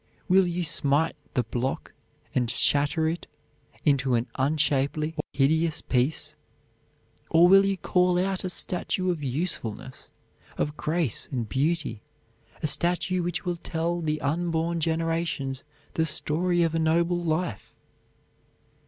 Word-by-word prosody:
Will 185 0 +4
you 175 +1 -2
smite 150 0 +2 0.2
the 125 - +2
block 120 +3 -3 0.4
and 125 -2 +1
shatter 145 +6 +2
it 165 +2 -3 0.6
into 135 -3 +3
an 115 0 0
unshapely 150 +2 0
or - - -1
hideous 155 +4 +2
piece; 130 +4 0 0.9
or 165 +2 +6
will 195 +2 +7
you 195 -1 0
call 180 +1 +2
out 190 +1 -1
a 185 - -2
statue 180 +1 +1
of 165 -4 -4
usefulness, 130 - -4 0.5
of 150 0 -1
grace 155 -6 0
and 120 -5 -2
beauty, 140 - -1 0.6
a - - +2
statue 175 +4 +1
which 175 0 -3
will 175 -1 -1
tell 170 +1 -2
the 155 -1 -1
unborn 165 +2 -1
generations 165 -4 -1 0.3
the 160 0 +1
story 170 +4 +1
of 165 -1 0
a 165 - 0
noble 170 +2 +1
life? 160 - -2
160 Hz, 130 wpm, -26 LUFS, 140-175 Hz, 0.9 s, will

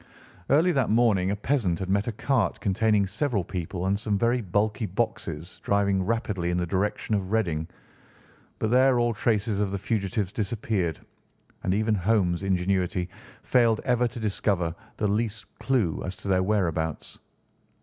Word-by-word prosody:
Early 160 +6 +4
that 135 -7 +1
morning 105 -5 +3
a 100 - 0
peasant 105 -5 0
had 95 - -4
met 100 +3 +1
a - - 0
cart 115 -3 0
containing 105 +1 +2
several 105 +1 -1
people 90 +1 -4
and 100 +1 +1
some 105 -2 0
very 120 +3 +2
bulky 105 +3 0
boxes 90 -5 -3
driving 100 -1 +1
rapidly 100 -4 -1
in 90 - 0
the 90 - 0
direction 100 +4 -1
of 95 -2 -1
Reading, 85 -8 0 0.9
but 110 - -1
there 130 0 +5
all 120 -1 +2
traces 105 -1 0
of 105 -1 +1
the 100 - -2
fugitives 100 -1 -1
disappeared, 100 -6 -2 0.6
and 90 - -1
even 110 +1 +1
Holmes' 95 -3 +1
ingenuity 95 -1 0 0.3
failed 115 -3 +3
ever 125 -1 +2
to 120 0 -8
discover 100 -5 0 0.2
the 105 - +1
least 105 0 -1
clue 120 -12 0
as 95 +1 -4
to 100 - -9
their 95 -1 +3
whereabouts. 85 -6 -1
100 Hz, 160 wpm, -26 LUFS, 95-115 Hz, 0.9 s, there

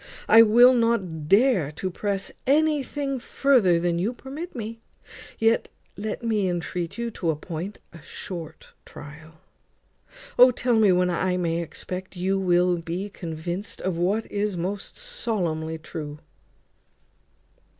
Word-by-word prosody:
I 225 +1 +9
will 240 +3 +7
not 190 -11 0
dare 200 - +4
to 185 +4 -4
press 200 +1 -2 0.2
anything 285 -2 +1
further 235 -9 +3
than 170 0 0
you 210 +7 0
permit 280 +8 -8
me. 225 -1 -6 0.6
Yet 225 +1 +2 0.3
let 215 +4 -5
me 215 -4 +1
intreat 175 +1 -3
you 235 0 -3
to 175 -5 -3
appoint 165 +5 -4 0.2
a 165 - -12
short 165 0 -8
trial. 150 +2 -12 1.1
O! 250 - +10
tell 245 -2 +1
me 210 -3 +5
when 180 0 +2
I 180 +1 0
may 170 -1 0
expect 185 +3 -7
you 190 +2 0
will 180 -1 +3
be 175 +5 -5
convinced 175 +4 -5
of 180 -3 -1
what 200 +6 +1
is 205 -2 -1
most 190 +4 -4
solemnly 180 - -2
true." 155 -2 -7
190 Hz, 130 wpm, -25 LUFS, 170-230 Hz, 1.1 s, O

